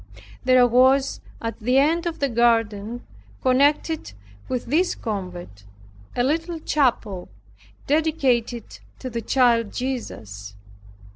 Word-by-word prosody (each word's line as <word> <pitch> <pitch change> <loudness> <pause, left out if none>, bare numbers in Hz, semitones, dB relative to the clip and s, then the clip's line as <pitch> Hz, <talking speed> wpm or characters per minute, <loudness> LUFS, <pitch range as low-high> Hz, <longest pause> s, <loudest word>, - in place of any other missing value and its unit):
There 255 -1 +5
was 260 +3 +3 0.2
at 230 -1 -4
the 250 +4 +1
end 330 +5 +3
of 330 - -3
the 280 - +1
garden 230 -2 +1 0.4
connected 285 - +2 0.4
with 255 -2 -2
this 335 +8 +1
convent, 180 - -6 0.5
a 245 - +1
little 325 +5 -1
chapel 235 - 0 0.6
dedicated 270 -6 0 0.2
to 255 - -7
the 230 0 -3
child 235 -3 +2
Jesus. 105 - -5
245 Hz, 110 wpm, -23 LUFS, 225-280 Hz, 0.6 s, There